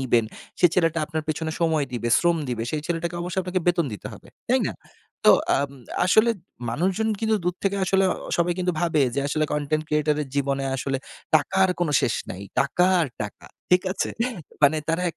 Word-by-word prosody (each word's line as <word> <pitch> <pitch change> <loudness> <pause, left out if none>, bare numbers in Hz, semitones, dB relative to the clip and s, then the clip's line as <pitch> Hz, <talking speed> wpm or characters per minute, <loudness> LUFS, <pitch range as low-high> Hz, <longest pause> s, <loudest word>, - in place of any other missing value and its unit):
নিবেন। 120 -3 +2 0.4
সেই 175 - +6
ছেলেটা 165 -2 +2
আপনার 155 0 -3
পেছনে 160 +1 -2
সময় 160 -3 +2
দিবে, 120 -1 -2
শ্রম 170 -1 +2
দিবে। 120 -2 -2
সেই 155 - -2
ছেলেটাকে 170 0 -2
অবশ্যই 180 +2 -2
আপনাকে 185 0 -1
বেতন 175 -2 +3
দিতে 105 - -7
হবে। - - -13 0.2
তাই - - +3
না? - - -2 0.5
তো - - +9 0.3
আম 140 0 -1 0.3
আসলে 220 +5 +5 0.4
মানুষজন 190 - 0
কিন্তু 220 -1 +2
দূর 180 0 0
থেকে 200 0 +1
আসলে 195 +1 +3 0.3
সবাই 175 0 +2
কিন্তু 180 0 0
ভাবে 165 -4 +2
যে - - +1
আসলে 155 +2 +1
কনটেন্ট 150 +1 0
ক্রিয়েটর 150 0 +1
এর 140 - -8
জীবনে 140 -1 0
আসলে 135 0 -1 0.4
টাকার 190 +5 +3
কোনো 165 -4 +1
শেষ 120 - +1 0.2
নেই, 95 - -6 0.2
টাকা 175 +6 +2
আর 160 - 0
টাকা। 105 - -8 0.2
ঠিক 180 0 +5
আছে? - - -2 0.5
মানে 145 +2 +6
তারা 165 +2 +1
160 Hz, 185 wpm, -24 LUFS, 140-180 Hz, 0.5 s, তো